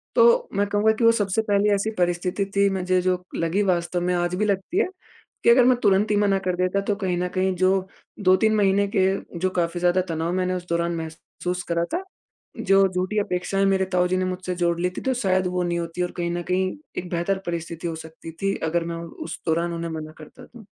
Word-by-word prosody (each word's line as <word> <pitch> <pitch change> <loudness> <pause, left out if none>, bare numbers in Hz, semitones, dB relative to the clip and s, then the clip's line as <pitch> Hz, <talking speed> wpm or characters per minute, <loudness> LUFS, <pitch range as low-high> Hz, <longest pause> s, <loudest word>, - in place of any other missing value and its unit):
तो 485 +1 +5
मैं 205 +1 +2
कहूँगा 205 +2 +3
कि 235 - +1
वो 230 - +7
सबसे 205 -2 0
पहली 205 -1 +2
ऐसी 200 +2 -1
परिस्थिति 180 +2 0
थी 200 0 +4
मुझे 185 -1 +1
जो 180 0 0
लगी 170 +4 0
वास्तव 175 0 0
में, 180 +1 0
आज 175 0 0
भी 210 +3 0
लगती 200 - -1
है 435 - +2 0.6
कि - - +5
अगर 245 +2 +7
मैं 255 -1 +5
तुरंत 205 +1 +3
ही 210 - +3
मना 200 -1 +2
कर 185 -2 -1
देता, 185 +2 0
तो 200 0 -1
कहीं 185 -3 -2
न 180 - 0
कहीं 185 0 +1
जो 185 +1 +2 0.3
2-3 200 +3 +3
महीने 200 -1 +3
के 190 -1 +4 0.3
जो 185 +2 +1
काफ़ी 170 +1 -1
ज़्यादा 180 +1 +3
तनाव 165 +1 -1
मैंने 185 0 0
उस 180 -1 -5
दौरान 170 0 0
महसूस 165 +2 -5
करा 170 0 +1
था, 360 - -1 0.5
जो 195 0 +4
झूठी 185 +3 -2
अपेक्षाएँ 195 +1 -1
मेरे 190 -1 +2
ताऊ 180 0 +3
जी 185 - +1
ने 185 - 0
मुझसे 185 0 -3
जोड़ 170 -1 +1
ली 180 +1 +1
थी। - - -3
तो 265 - 0
शायद 190 -6 +1
वो 180 0 -1
नहीं 175 0 -1
होती 170 +1 -3
और 180 - -1
कहीं 170 -1 -1
न 175 0 -2
कहीं 185 +4 0 0.2
एक 180 - -4
बेहतर 175 +3 0
परिस्थिति 170 0 -4
हो 165 - -2
सकती 160 +1 -10
थी 195 0 +1 0.2
अगर 170 0 0
मैं 170 0 -4
उ 170 0 -7 0.2
उस 165 - -7
दौरान 170 +1 +1
उन्हें 170 0 -4
मना 155 -1 -6
करता 155 - -13
तो। 230 -4 -15
185 Hz, 230 wpm, -24 LUFS, 175-195 Hz, 0.6 s, वो